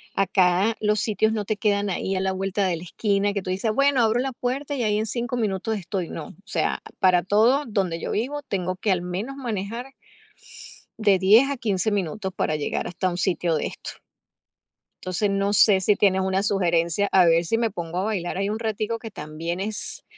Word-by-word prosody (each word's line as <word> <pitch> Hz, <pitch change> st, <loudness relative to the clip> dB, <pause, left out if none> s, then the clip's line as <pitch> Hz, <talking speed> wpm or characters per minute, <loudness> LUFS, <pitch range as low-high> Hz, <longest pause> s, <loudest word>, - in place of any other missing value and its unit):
Acá 195 Hz, +2 st, +2 dB
los 210 Hz, -1 st, +2 dB
sitios 220 Hz, 0 st, +1 dB
no 210 Hz, -2 st, -2 dB
te 215 Hz, -, -1 dB
quedan 205 Hz, -1 st, +1 dB
ahí 190 Hz, +1 st, -2 dB
a -, -, 0 dB
la 190 Hz, 0 st, 0 dB
vuelta 195 Hz, +1 st, -1 dB
de 175 Hz, -, 0 dB
la 165 Hz, -, -9 dB
esquina, 200 Hz, +2 st, 0 dB
que 200 Hz, -, -2 dB
tú 185 Hz, -, -7 dB
dices: 215 Hz, +4 st, 0 dB
"Bueno, 275 Hz, 0 st, +3 dB
abro 225 Hz, +2 st, +2 dB
la 265 Hz, 0 st, -2 dB
puerta 270 Hz, +4 st, -3 dB
y 245 Hz, -, -1 dB
ahí 210 Hz, -1 st, +1 dB
en 220 Hz, -, -1 dB
5 240 Hz, +2 st, -2 dB
minutos 215 Hz, 0 st, -1 dB
estoy", 185 Hz, -1 st, -4 dB
no, 155 Hz, -, -6 dB
o -, -, -14 dB
sea, 205 Hz, -, -1 dB, 0.2 s
para 180 Hz, -2 st, +4 dB
todo 230 Hz, +9 st, +3 dB
donde 190 Hz, -6 st, -1 dB
yo -, -, -3 dB
vivo 280 Hz, +7 st, -2 dB
tengo 185 Hz, -5 st, -2 dB
que 205 Hz, +1 st, 0 dB
al 180 Hz, -2 st, +1 dB
menos 195 Hz, +10 st, -4 dB
manejar 235 Hz, +2 st, -4 dB, 1.1 s
de 200 Hz, -3 st, +4 dB
10 220 Hz, +9 st, +5 dB
a 275 Hz, -, -3 dB
15 210 Hz, -2 st, 0 dB
minutos 190 Hz, 0 st, -2 dB
para 155 Hz, -, 0 dB
llegar 145 Hz, -, -2 dB
hasta 185 Hz, +1 st, -2 dB
un 175 Hz, -, -5 dB
sitio 175 Hz, -2 st, 0 dB
de -, -, -1 dB
estos. -, -, -7 dB, 1.1 s
Entonces, 185 Hz, +3 st, 0 dB
no 200 Hz, +1 st, 0 dB
sé 200 Hz, -2 st, +5 dB
si 205 Hz, +2 st, +3 dB
tienes 190 Hz, -2 st, +3 dB
una 190 Hz, +1 st, 0 dB
sugerencia, 175 Hz, -1 st, +1 dB
a 185 Hz, -2 st, +6 dB
ver 165 Hz, +1 st, +4 dB
si 225 Hz, +7 st, 0 dB
me 230 Hz, -2 st, +1 dB
pongo 175 Hz, -2 st, -5 dB
a 190 Hz, -, 0 dB
bailar 190 Hz, -4 st, -2 dB
ahí 195 Hz, +1 st, 0 dB
un 215 Hz, -, -2 dB
ratico 220 Hz, 0 st, -2 dB
que 225 Hz, -1 st, -8 dB
también 165 Hz, +1 st, -5 dB
es 215 Hz, +1 st, -4 dB
200 Hz, 210 wpm, -24 LUFS, 185-220 Hz, 1.1 s, a